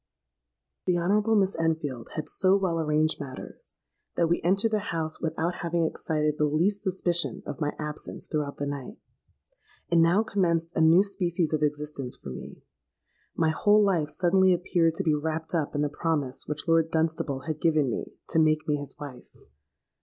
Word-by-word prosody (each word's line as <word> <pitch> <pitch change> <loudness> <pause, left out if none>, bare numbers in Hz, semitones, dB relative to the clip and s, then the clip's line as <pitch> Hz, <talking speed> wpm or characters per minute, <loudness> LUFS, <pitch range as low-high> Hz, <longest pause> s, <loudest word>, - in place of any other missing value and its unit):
"The 180 -1 +3
Honourable 205 +6 +2
Miss 195 -2 +2
Enfield 155 -7 -2
had 155 - -3
so 190 +1 +3
well 180 -4 0
arranged 155 0 +1
matters, 130 -2 -6 0.4
that 170 - +3
we 170 - +1
entered 195 +6 +2
the 215 - +2
house 160 -1 -3
without 165 +1 -1
having 170 -1 0
excited 150 -1 -1
the 150 - +4
least 180 +7 +1
suspicion 180 -3 -1
of 145 - -6
my 150 -1 0
absence 150 -1 -5
throughout 150 -2 -3
the 145 - -2
night. 140 - -6 0.9
And 170 -1 +5
now 175 +6 +4
commenced 170 -6 0
a - - +2
new 165 +4 +6
species 175 -5 -1
of 155 - +1
existence 150 -3 -1
for - - -9
me. 65 - -9 0.7
My 160 -1 +2
whole 205 +6 +4
life 175 -7 +1
suddenly 185 +2 +3
appeared 170 -2 +1
to - - -1
be 155 - +2
wrapped 160 +2 -2
up 155 -3 -1
in 145 - +1
the - - +2
promise 145 -3 -2
which 150 0 -4
Lord 165 -1 +3
Dunstable 160 -4 -1
had 155 0 -5
given 155 -6 +2
me - - -5
to 165 - +2
make 155 0 +2
me 150 -1 +1
his 145 -1 -6
wife. 140 -5 -10
160 Hz, 175 wpm, -27 LUFS, 150-175 Hz, 0.9 s, new